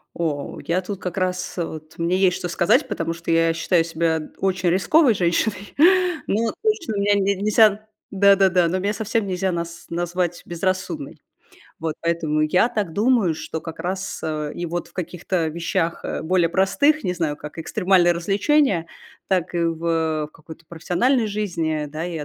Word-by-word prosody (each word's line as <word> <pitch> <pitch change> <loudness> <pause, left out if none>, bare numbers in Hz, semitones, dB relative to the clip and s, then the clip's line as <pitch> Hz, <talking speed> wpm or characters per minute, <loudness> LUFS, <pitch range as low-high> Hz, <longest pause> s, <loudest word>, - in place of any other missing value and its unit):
О, 150 -4 -3
я 180 +3 +1
тут 195 +1 -6
как 180 0 -5
раз 185 0 -2
вот 155 -2 -5
мне 170 +2 +1
есть, 185 -2 +3
что 175 - -4
сказать. 170 0 +2
Потому 165 0 -2
что 165 0 -4
я 165 0 +3
считаю 170 0 +2
себя 160 -1 -1
очень 185 -2 0
рисковой 230 - +4
женщиной, 195 +2 -1 0.5
но 225 +2 0
точно 425 - 0
меня 205 +1 +2
не 200 0 +1
нельзя, 215 +1 +3 0.2
да-да-да, 190 -3 +4
но 185 +3 -1
меня 200 +2 -1
совсем 215 0 -1
нельзя 185 0 -1
наз 170 0 -5
назвать 175 0 -2
безрассудной, 175 -4 -3 0.6
вот. 160 -1 -3
Поэтому 165 -2 0
я 180 +9 +3
так 210 -8 -2
думаю, 215 -5 +2
что 160 +1 -5
как 165 -1 -8
раз 190 +2 -4 0.3
и 175 - -4
вот 175 +1 -4
в - - -24
каких-то 175 -1 -2
вещах, 165 +1 -2
э, - - -3
более 175 +1 +2
простых, 240 - +2
не 180 - 0
знаю, 160 -4 -2
как 150 +2 -10
экстремальное 180 +1 +3
развлечение, 195 - +1 0.4
так 185 -2 0
и - - 0
в 165 -2 0
какой-то 160 +1 -13
профессиональной 180 - +1
жизни, 165 -7 -2
да. 155 +2 -6
Я 165 -3 -4
175 Hz, 160 wpm, -22 LUFS, 165-195 Hz, 0.6 s, рисковой